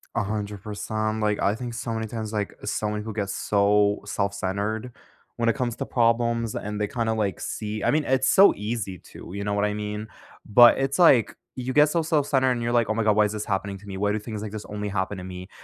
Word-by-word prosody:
100%, 105 Hz, +1 st, -4 dB
um, 110 Hz, 0 st, 0 dB
like, 105 Hz, -1 st, +1 dB
I 100 Hz, -, +2 dB
think 120 Hz, 0 st, -6 dB
so 115 Hz, 0 st, -4 dB
many 110 Hz, 0 st, -3 dB
times, 110 Hz, -1 st, -5 dB
like, 105 Hz, -2 st, -2 dB
so 105 Hz, -, -1 dB
many 105 Hz, 0 st, -3 dB
people 110 Hz, +1 st, -6 dB
get 100 Hz, -2 st, -2 dB
so 100 Hz, +1 st, +2 dB
self-centered 100 Hz, +3 st, -2 dB, 0.5 s
when 115 Hz, 0 st, +2 dB
it -, -, +1 dB
comes 125 Hz, -3 st, -2 dB
to -, -, -3 dB
problems, 115 Hz, -1 st, +1 dB
and 105 Hz, 0 st, -4 dB
they, 105 Hz, -, +1 dB
kinda, 115 Hz, 0 st, -1 dB
like, 105 Hz, -5 st, -1 dB
see 105 Hz, 0 st, -4 dB
I -, -, +3 dB
mean, 150 Hz, 0 st, +2 dB
it's 130 Hz, 0 st, +2 dB
so 195 Hz, +1 st, +7 dB
easy 105 Hz, -3 st, -4 dB
to, -, -, -12 dB
you 100 Hz, 0 st, -4 dB
know 105 Hz, 0 st, -1 dB
what 100 Hz, 0 st, +1 dB
I 105 Hz, -, -1 dB
mean? 105 Hz, +1 st, -4 dB, 0.4 s
But 120 Hz, +3 st, +7 dB
it's 135 Hz, +1 st, 0 dB
like, 130 Hz, -, +5 dB, 0.2 s
you 130 Hz, 0 st, -3 dB
get 150 Hz, +1 st, +5 dB
so 170 Hz, +2 st, +1 dB
self-centered, 145 Hz, -5 st, +2 dB
and 120 Hz, -1 st, -1 dB
you're 120 Hz, -, -1 dB
like, 120 Hz, -2 st, +2 dB
"Oh -, -, +2 dB
my 115 Hz, +1 st, 0 dB
god, 105 Hz, -1 st, +3 dB
why 105 Hz, -, +5 dB
is 105 Hz, -, -2 dB
this 105 Hz, -1 st, -3 dB
happening 100 Hz, 0 st, -2 dB
to 105 Hz, -, -16 dB
me? 95 Hz, -1 st, -6 dB
Why 105 Hz, +1 st, +1 dB
do 110 Hz, -, -1 dB
things 105 Hz, -1 st, -6 dB
like 105 Hz, -1 st, -5 dB
this 105 Hz, -1 st, -5 dB
only 105 Hz, 0 st, -5 dB
happen 95 Hz, +1 st, -2 dB
to 90 Hz, -, -7 dB
me?" 90 Hz, 0 st, -8 dB
105 Hz, 245 wpm, -25 LUFS, 105-120 Hz, 0.5 s, so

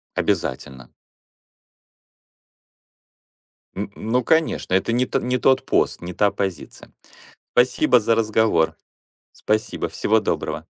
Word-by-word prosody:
Обязательно. 65 Hz, 0 st, -3 dB, 2.9 s
Н 100 Hz, +1 st, -5 dB
ну, 120 Hz, +3 st, -1 dB
конечно. 160 Hz, -, +1 dB
Это 95 Hz, +4 st, +1 dB
не 125 Hz, +2 st, +2 dB
т -, -, -1 dB
не 125 Hz, +1 st, -1 dB
тот 130 Hz, +1 st, +2 dB
пост, -, -, 0 dB
не 90 Hz, +1 st, -6 dB
та 100 Hz, +2 st, +2 dB
позиция. 95 Hz, -6 st, -6 dB, 0.6 s
Спасибо 125 Hz, +1 st, +3 dB
за 115 Hz, +2 st, +2 dB
разговор. 110 Hz, -7 st, +1 dB, 0.6 s
Спасибо, 110 Hz, 0 st, -2 dB
всего -, -, +1 dB
доброго. -, -, -3 dB
110 Hz, 105 wpm, -22 LUFS, 95-125 Hz, 2.9 s, Спасибо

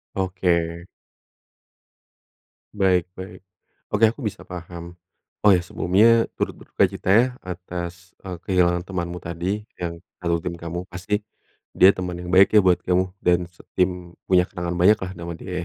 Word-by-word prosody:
Oke. 85 Hz, -3 st, 0 dB, 1.9 s
Baik 95 Hz, -4 st, +2 dB
baik. 95 Hz, 0 st, -10 dB, 0.5 s
Oke 110 Hz, +1 st, +5 dB
aku 120 Hz, +3 st, -7 dB
bisa 105 Hz, -, -4 dB
paham. 85 Hz, -1 st, -9 dB, 0.5 s
Oh 105 Hz, -, +8 dB
ya 90 Hz, -, +3 dB
sebelumnya 110 Hz, +6 st, +3 dB
turut -, -, -3 dB
berdukacita -, -, -1 dB
ya 115 Hz, +4 st, +6 dB, 0.2 s
atas, 90 Hz, -1 st, -7 dB
eee, 90 Hz, -2 st, -5 dB
kehilangan 90 Hz, -2 st, +2 dB
temanmu 90 Hz, -2 st, -5 dB
tadi 85 Hz, +5 st, -3 dB, 0.2 s
yang 85 Hz, -1 st, -5 dB, 0.2 s
satu 85 Hz, -2 st, -1 dB
tim 90 Hz, -1 st, -4 dB
kamu. 85 Hz, +1 st, -5 dB
Pasti 105 Hz, +4 st, -2 dB, 0.6 s
dia 95 Hz, +2 st, +8 dB
teman 90 Hz, -1 st, -4 dB
yang 90 Hz, +1 st, -6 dB
baik 95 Hz, +1 st, +7 dB
ya -, -, +8 dB
buat 90 Hz, -1 st, +4 dB
kamu 90 Hz, 0 st, 0 dB
dan 90 Hz, 0 st, +2 dB
setim 90 Hz, 0 st, -3 dB
punya 90 Hz, -1 st, +3 dB
kenangan 90 Hz, -1 st, -4 dB
banyak 90 Hz, +5 st, +5 dB
lah 95 Hz, -2 st, -5 dB
nama 85 Hz, -1 st, -6 dB
dia 90 Hz, -, -9 dB
90 Hz, 145 wpm, -23 LUFS, 85-95 Hz, 1.9 s, Oh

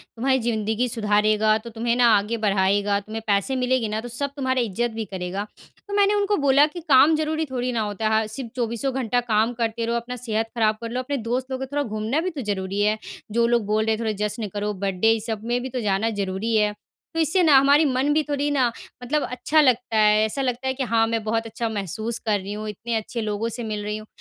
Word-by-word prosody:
तुम्हारी 260 Hz, +3 st, +1 dB
ज़िंदगी 225 Hz, 0 st, -1 dB
सुधारेगा 215 Hz, 0 st, +2 dB
तो 220 Hz, +2 st, -9 dB
तुम्हें 235 Hz, +1 st, -1 dB
ना 245 Hz, -1 st, +4 dB
आगे 210 Hz, +3 st, 0 dB
बढ़ाएगा, 200 Hz, 0 st, +2 dB
तुम्हें 215 Hz, +2 st, -7 dB
पैसे 200 Hz, +5 st, +1 dB
मिलेंगे 255 Hz, -2 st, +1 dB
ना 215 Hz, +1 st, -2 dB
तो 245 Hz, -, -7 dB
सब 275 Hz, +4 st, -3 dB
तुम्हारा 260 Hz, -2 st, 0 dB
इज़्ज़त 235 Hz, +2 st, -1 dB
भी 220 Hz, 0 st, -4 dB
करेगा। 190 Hz, 0 st, -4 dB, 0.4 s
तो 405 Hz, -, -6 dB
मैंने 405 Hz, 0 st, +4 dB
उनको 410 Hz, 0 st, +1 dB
बोला 280 Hz, 0 st, +5 dB
कि 345 Hz, +3 st, -8 dB
काम 310 Hz, -1 st, +5 dB
ज़रूरी 315 Hz, +1 st, -1 dB
थोड़ी 250 Hz, -1 st, -1 dB
ना 230 Hz, -, -1 dB
होता 210 Hz, +1 st, -1 dB
है। 220 Hz, 0 st, +1 dB
सिर्फ़ 230 Hz, +2 st, -4 dB
चौबीसों 240 Hz, +2 st, -1 dB
घंटा 245 Hz, -1 st, 0 dB
काम 225 Hz, 0 st, +1 dB
करते 230 Hz, 0 st, -1 dB
रहो 235 Hz, +1 st, -1 dB
अपना 240 Hz, +2 st, -5 dB
सेहत 225 Hz, -2 st, -1 dB
ख़राब 215 Hz, -1 st, +2 dB
कर 230 Hz, -, -4 dB
लो, 250 Hz, -, -2 dB
अपने 280 Hz, +2 st, -2 dB
दोस्त 250 Hz, +3 st, -3 dB
लोग 260 Hz, -, -2 dB
को -, -, -2 dB
थोड़ा 285 Hz, +2 st, -2 dB
घूमना 215 Hz, +5 st, -2 dB
भी 370 Hz, -, -1 dB
तो 310 Hz, -6 st, -6 dB
ज़रूरी 200 Hz, -2 st, -2 dB
है। 210 Hz, +1 st, +2 dB, 0.3 s
जो 235 Hz, +2 st, +2 dB
लोग 235 Hz, -2 st, +1 dB
बोल 215 Hz, +1 st, +1 dB
रहे 225 Hz, -, +1 dB
हैं -, -, -9 dB
थोड़ा 220 Hz, -1 st, 0 dB, 0.2 s
जश्न 215 Hz, 0 st, -4 dB
करो 210 Hz, 0 st, -2 dB
बर्थडे 195 Hz, +3 st, +1 dB
इस 225 Hz, -1 st, 0 dB
सब 220 Hz, -2 st, -3 dB
में 240 Hz, +1 st, 0 dB
भी 260 Hz, -, -5 dB
तो 255 Hz, -, -3 dB
जाना 210 Hz, +1 st, +1 dB
ज़रूरी 195 Hz, +4 st, -1 dB
है। 210 Hz, -1 st, +2 dB, 0.4 s
तो 330 Hz, -, -2 dB
इससे 320 Hz, +4 st, +3 dB
ना 305 Hz, -4 st, +6 dB
हमारी 285 Hz, +3 st, +5 dB
मन 265 Hz, +2 st, +1 dB
भी 310 Hz, -, +3 dB
थोड़ी 290 Hz, 0 st, -1 dB
ना 270 Hz, -3 st, +3 dB, 0.4 s
मतलब 295 Hz, +4 st, 0 dB
अच्छा 305 Hz, +5 st, +2 dB
लगता 245 Hz, -4 st, +2 dB
है, 215 Hz, 0 st, +5 dB
ऐसा 220 Hz, +6 st, -2 dB
लगता 255 Hz, 0 st, -2 dB
है 260 Hz, -, +1 dB
कि 265 Hz, 0 st, -3 dB
हाँ, 230 Hz, -1 st, +2 dB
मैं 225 Hz, -1 st, -1 dB
बहुत 225 Hz, +1 st, -1 dB
अच्छा 225 Hz, +1 st, -3 dB
महसूस 220 Hz, +2 st, -3 dB
कर 210 Hz, -2 st, +2 dB
रही 195 Hz, +2 st, -6 dB
हूँ 215 Hz, +1 st, -5 dB
इतने 225 Hz, +3 st, -4 dB
अच्छे 225 Hz, +2 st, -3 dB
लोगों 215 Hz, +2 st, -2 dB
से 235 Hz, +2 st, -5 dB
मिल 210 Hz, -2 st, -4 dB
रही 210 Hz, +1 st, -3 dB
हूँ। 215 Hz, -, -11 dB
230 Hz, 245 wpm, -23 LUFS, 215-260 Hz, 0.4 s, ना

